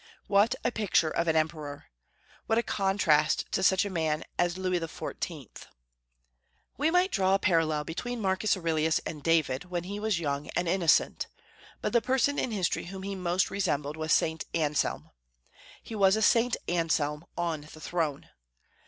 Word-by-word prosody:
What 210 +5 +3
a 240 - +1
picture 200 -8 +1
of 170 - -1
an 160 - +2
emperor! 155 -2 -2 0.6
What 225 - +2
a 235 - +2
contrast 190 -8 +2
to - - 0
such 190 +1 +4
a - - -3
man 160 -3 -1
as 175 0 0
Louis 185 -1 0
XIV! 160 -3 -6 1.1
We 295 +3 +1
might 360 +3 +3
draw 190 -1 +3
a - - +4
parallel 165 -5 +1
between 240 +11 -4
Marcus 195 0 +1
Aurelius 160 -2 +1
and 150 - -5
David, 160 -2 +1
when 175 -1 -3
he 200 +3 -5
was 210 -4 0
young 145 -2 -2
and 175 - 0
innocent. 170 -2 +2 0.5
But - - -2
the 235 - +4
person 265 +3 +1
in - - -1
history 195 -6 -1
whom 190 +2 -7
he 200 +1 -4
most 180 -1 0
resembled 150 -7 -1
was 155 0 -3
St. 160 0 +2
Anselm. 150 -3 -1 0.7
He - - -9
was 195 -2 +4
a 220 - 0
St. 235 +2 +3
Anselm 160 -3 0
on 170 -3 -1
the 155 - -12
throne. 155 -4 -2
175 Hz, 165 wpm, -29 LUFS, 155-200 Hz, 1.1 s, such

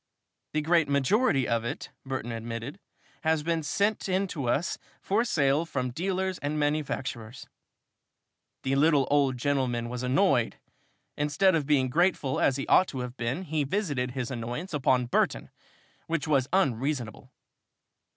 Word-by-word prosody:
"The 155 - +1
great 165 -2 +3
majority 140 - +2
of 115 -1 0
it," 120 - -5
Burton 130 -3 -4
admitted, 115 - -5 0.4
"has 160 -2 +1
been 165 0 0
sent 200 +7 0
in 190 +1 +1
to 140 -9 -3
us 165 +8 0 0.2
for 210 +4 +1
sale 145 - +2
from 130 -6 -3
dealers 185 +5 -2
and 145 +2 -2
manufacturers." 140 -5 -2 1.2
The 130 - 0
little 145 -1 +4
old 140 -3 +3
gentleman 125 -3 0
was 125 0 -4
annoyed. 125 - +2 0.6
Instead 150 +6 +3
of 155 -4 0
being 140 -4 +3
grateful, 160 -2 +1
as 135 - +2
he 135 - -3
ought 185 - +5
to 130 - -5
have 125 0 -6
been, 125 +9 -2
he 155 -4 -1
visited 140 -6 -1
his 125 0 -2
annoyance 125 +9 -5
upon 130 -3 +2
Burton, 120 - 0 0.6
which 165 -1 -1
was 140 -4 +2
unreasonable. 135 - -1
140 Hz, 145 wpm, -28 LUFS, 125-165 Hz, 1.2 s, ought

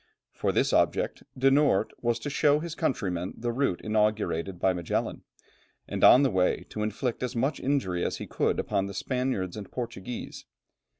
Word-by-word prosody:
For - - 0
this - - +1
object, - - +1 0.2
De 135 +1 +4
Noort 135 -8 +3
was 120 -1 +1
to 145 - -3
show 145 +1 +4
his 165 +1 -5
countrymen 95 - -2
the 120 0 -2
route 120 -7 0
inaugurated 105 -5 0
by 95 0 +3
Magellan, 85 -2 -2 0.7
and - - -3
on 130 - +8
the 135 - +2
way 95 -1 +1
to 105 - -5
inflict 110 +3 -2
as 125 -2 -3
much 135 +6 0
injury 130 -11 0
as - - -1
he - - -6
could - - 0
upon 100 -2 0
the 100 - -7
Spaniards 125 -6 -2
and 105 -3 -8
Portuguese. 120 -2 -6
115 Hz, 175 wpm, -28 LUFS, 95-130 Hz, 0.7 s, on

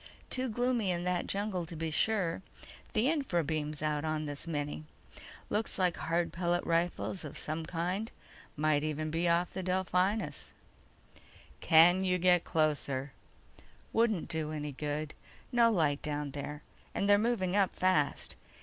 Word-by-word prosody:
"Too 260 0 -1
gloomy 240 -2 +1
in 175 -1 0
that 180 -1 0
jungle 200 -3 -1
to 170 - -8
be 160 0 -3
sure. 185 -1 +1 0.5
The 220 +4 +3
infra 275 - +1
beam's 155 0 -2
out 150 -1 0
on 155 -1 -1
this 145 +2 -5
mini. 150 -1 -3 0.6
Looks 215 +1 -1
like 180 -3 +2
hard 170 +1 -1
pellet 175 0 0
rifles 175 +2 0
of 150 - -7
some 155 +1 -3
kind. 180 +6 -2 0.5
Might 150 -1 +2
even 155 0 -2
be 170 +2 +1
off 170 +1 +1
the 190 - -3
Delphinus." 185 +3 0 1.1
"Can't 175 +3 +6
you 180 -1 +2
get 180 -1 +4
closer?" 145 -4 0 0.8
"Wouldn't 225 -6 +2
do 160 -2 -3
any 150 -1 -4
good. 150 +2 -3 0.4
No 235 -1 +5
light 155 -8 +1
down 145 -1 -3
there, 145 +1 -6 0.3
and 200 - 0
they're 205 0 +6
moving 210 -5 0
up 200 -2 +3
fast." 185 -6 +1
170 Hz, 150 wpm, -32 LUFS, 155-190 Hz, 1.1 s, Can't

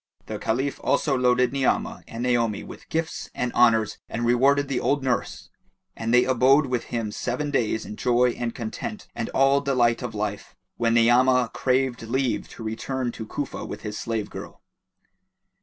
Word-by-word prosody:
The - - -5
Caliph 130 +5 -1
also 140 -3 +2
loaded 125 0 +2
Ni'amah 135 -2 0
and 115 +1 -5
Naomi 120 -4 +1
with - - -12
gifts 160 0 -3
and 125 -1 -2
honours 115 -3 +3
and 120 +1 -2
rewarded 135 +4 +3
the 135 -2 -1
old 140 -1 0
nurse; 130 -2 -2 0.4
and 115 0 -3
they 125 +1 +6
abode 130 +3 +4
with 125 -3 -2
him 115 -3 -3
seven 145 +7 -3
days 110 -5 0
in 105 - -8
joy 125 0 +3
and 120 -1 -4
content 200 - -5
and 115 - -4
all 135 +1 +3
delight 125 -4 +2
of 120 -3 -5
life, 105 -1 -4 0.2
when 115 -1 +2
Ni'amah 125 +1 +4
craved 130 -1 0
leave 125 +2 -1
to 115 - -10
return 120 +3 -3
to 110 -2 -8
Cufa 145 +5 -4
with - - -7
his 105 -1 -5
slave 110 -3 -3
girl. - - -9
125 Hz, 170 wpm, -25 LUFS, 115-135 Hz, 0.4 s, they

